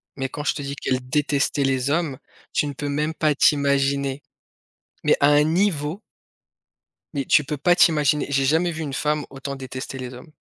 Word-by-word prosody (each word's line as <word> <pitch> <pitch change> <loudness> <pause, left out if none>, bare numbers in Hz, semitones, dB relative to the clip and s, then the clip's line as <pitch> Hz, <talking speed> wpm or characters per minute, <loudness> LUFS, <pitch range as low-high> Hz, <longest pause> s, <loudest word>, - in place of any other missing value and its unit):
mais 135 -1 -3
quand 145 - -6
je - - +1
te 145 - -5
dis 140 0 -5
qu'elle 130 -2 -2
détestait 145 0 +1
les 135 0 0
hommes, 155 -3 0 0.4
tu - - +1
ne - - -3
peux 145 +1 -5
même 150 +2 -1
pas 155 -2 +1
t'imaginer, 140 -1 +2 0.8
mais - - +4
à 140 - +5
un 145 0 +5
niveau 165 0 0 1.1
mais 140 -2 -2
tu 150 - +4
peux 145 +2 -4
pas 175 +5 +3
t'imaginer, 150 -4 +3
j'ai 135 -1 +1
jamais 165 +5 +2
vu 160 -1 -6
une 140 -3 -5
femme 150 +1 -1
autant 135 0 -6
détester 130 +1 -7
les 130 -1 -6
hommes. 125 +5 -12
145 Hz, 190 wpm, -23 LUFS, 135-150 Hz, 1.1 s, à